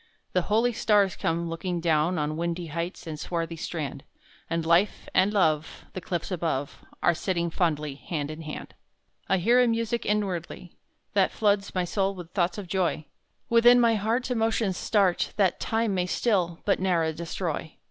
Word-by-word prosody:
The 180 - +3
holy 225 +6 +2
stars 205 -5 +3
come 170 +1 -1
looking 170 +2 -3
down 165 +1 +2
On 150 0 -1
windy 170 +1 -2
heights 170 +2 -4
and 155 -2 -6
swarthy 165 -1 -3
strand, 155 -4 -5 0.5
And 165 -1 -1
Life 170 +5 +2
and 190 +2 +4
Love 160 -7 0
The 185 - -5
cliffs 175 +1 -3
above 160 -6 -2 0.2
Are 175 - +5
sitting 170 0 -1
fondly 150 -5 0
hand 145 +1 -4
in 155 +1 -8
hand. 155 -1 -7 0.6
I 190 - +4
hear 235 +7 +4
a 250 - +4
music 230 0 0
inwardly, 185 -4 -2 0.4
That 195 -2 +3
floods 205 -2 0
my 180 -1 +1
soul 195 +2 0
with 175 -2 -9
thoughts 180 -1 0
of 205 - -5
joy; 175 -4 -1 0.4
Within 240 +1 +6
my 235 -1 +4
heart 225 +5 0
Emotions 225 -4 +1
start 195 -2 +1
That 195 -4 +2
Time 225 -2 0
may 180 -1 0
still 180 -5 0
but 200 - +2
ne'er 170 -4 +1
destroy. 165 -1 -4
180 Hz, 170 wpm, -27 LUFS, 165-205 Hz, 0.6 s, Within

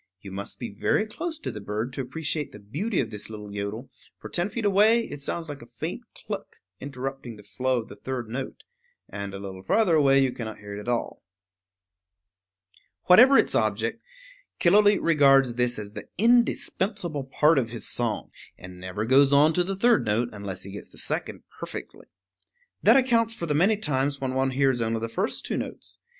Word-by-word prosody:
You 100 -1 -10
must 100 +1 -6
be 120 - -6
very 105 - +1
close 320 +9 -5
to 315 - -5
the 105 - -8
bird 105 +5 -3
to 135 - -3
appreciate 150 +3 -3
the - - -11
beauty 160 - -2
of 115 -3 -5
this 105 0 -6
little 105 -2 -8
yodel; 105 +5 -5 0.3
for - - -9
ten 175 +3 0
feet 230 0 -4
away 215 +4 +4
it 145 - -8
sounds 165 +4 -3
like 145 -2 -7
a 120 - -12
faint - - -5
cluck - - -7 0.2
interrupting 135 -3 -6
the 105 - -14
flow 130 +1 -1
of - - -18
the - - -11
third 130 -3 -5
note; 130 +4 -6 0.4
and 100 -1 -6
a 100 - -6
little 95 -1 -8
farther 185 - +2
away 140 -3 +5
you 135 -1 +3
cannot 110 -3 -6
hear 100 0 -8
it - - -6
at 105 - -10
all. 120 -1 -2 1.5
[Illustration: 90 - -53 0.3
Killooleet] - - -29
Whatever 250 +9 +8
its - - +3
object, - - 0 0.6
Killooleet 205 +3 +5
regards 135 -6 +5
this 125 0 0
as 105 -1 -7
the - - -8
indispensable 200 - +1
part 150 +3 +3
of 115 -3 -2
his 115 -1 -3
song, 115 -3 -1 0.3
and 90 0 -11
never 95 +4 -4
goes 135 +3 +5
on 145 +3 +5
to 180 - +2
the 195 +2 -3
third 235 +3 +3
note 115 +3 0
unless 100 -3 -6
he 100 - -8
gets 100 - -9
the - - -18
second - - -3 0.2
perfectly. - - -8 0.7
That - - +6
accounts 230 -3 +2
for 170 - -4
the 150 - -1
many 195 +8 +3
times 140 -6 0
when 130 -1 -2
one 135 0 +1
hears 130 -2 +1
only 115 0 0
the 115 +1 -4
first 190 - -2
two - - -2
notes. - - -6
135 Hz, 200 wpm, -26 LUFS, 110-175 Hz, 1.5 s, Whatever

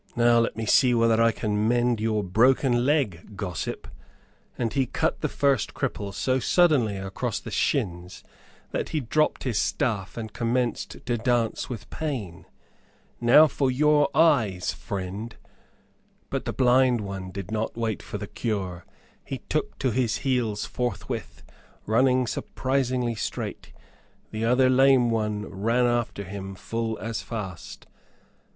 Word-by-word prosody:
"Now 120 0 +5
let 115 - 0
me 115 - -2
see 125 +3 +4
whether 115 -1 +3
I 115 0 +5
can 105 -1 -1
mend 120 -1 +2
your 110 -1 0
broken 120 +5 +3
leg, 105 - 0
gossip," 90 -6 -4 0.7
and 115 -2 -1
he 135 -2 +1
cut - - -1
the - - 0
first 140 -5 +1
cripple 100 -1 -3
so 130 +6 0
suddenly 130 - +3
across 95 0 -3
the - - -9
shins 90 0 -1 0.5
that - - -2
he 155 - -1
dropped 150 +4 0
his 120 -5 0
staff 110 -10 -1
and 110 -2 -6
commenced 120 0 -2
to 120 -1 0
dance 120 -1 0
with 120 -4 -6
pain. 125 - -4 0.7
"Now 120 +6 +7
for 140 -2 0
your 150 +3 +3
eyes, 120 - +3
friend." 100 +4 -5 1.0
But - - -2
the - - -1
blind 125 -2 +3
one 95 -2 -6
did 95 +2 -7
not 110 +1 -2
wait 115 -3 -2
for - - -6
the - - -5
cure. 95 -6 -4 0.4
He - - -6
took - - -1
to 130 - 0
his 115 -1 0
heels 115 -6 0
forthwith, 120 -5 -4 0.4
running 125 +3 +3
surprisingly 130 0 -1
straight. 110 - -5 0.6
The 110 +1 -2
other 125 +2 +4
lame 130 -2 +5
one 105 -2 -1
ran 115 +7 0
after 120 -4 -1
him 95 +1 -7
full 115 +2 -3
as 115 0 -4
fast. 100 -7 -7
115 Hz, 145 wpm, -26 LUFS, 105-130 Hz, 1.0 s, Now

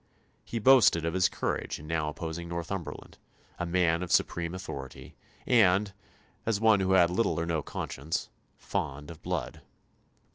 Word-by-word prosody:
He 115 - -5
boasted 115 -8 +5
of 85 - -1
his 90 -1 +3
courage - - -3
in 75 - -11
now 80 -1 -1
opposing 80 +2 -6
Northumberland 85 +1 -6 0.4
a 90 - -2
man 85 -1 +2
of 90 - -4
supreme 85 +1 +1
authority, 70 -8 -8 0.3
and 100 -4 +4 0.5
as 110 -3 0
one 110 -2 +5
who 95 0 +1
had 90 -2 +5
little 90 -1 +1
or 85 - -1
no 80 -2 -1
conscience 75 +2 -4 0.3
fond 75 +3 -4
of 80 -1 -12
blood. - - -4
85 Hz, 150 wpm, -29 LUFS, 80-95 Hz, 0.5 s, boasted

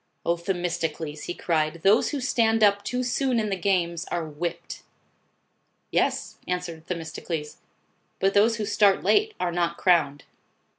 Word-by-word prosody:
" - - -46
O 170 - +2
Themistocles," 165 -4 -3
he 175 - -4
cried, 160 -1 -1
" - - -31
those 205 +4 +4
who 290 - -3
stand 225 -4 +2
up 200 -1 +4
too 250 0 -2
soon 250 0 0
in 215 -2 -1
the - - +1
games, 175 -3 0
are 170 -2 -3
whipped." 170 +3 -5 1.1
"Yes," - - 0
answered 180 -2 -4
Themistocles, 160 -2 -5 0.6
"but 195 +1 +2
those 220 +3 +4
who 215 -2 -3
start 205 -2 +3
late, 430 +1 +2
are 175 - 0
not 170 0 -1
crowned." 150 -6 +2
180 Hz, 155 wpm, -25 LUFS, 165-210 Hz, 1.1 s, those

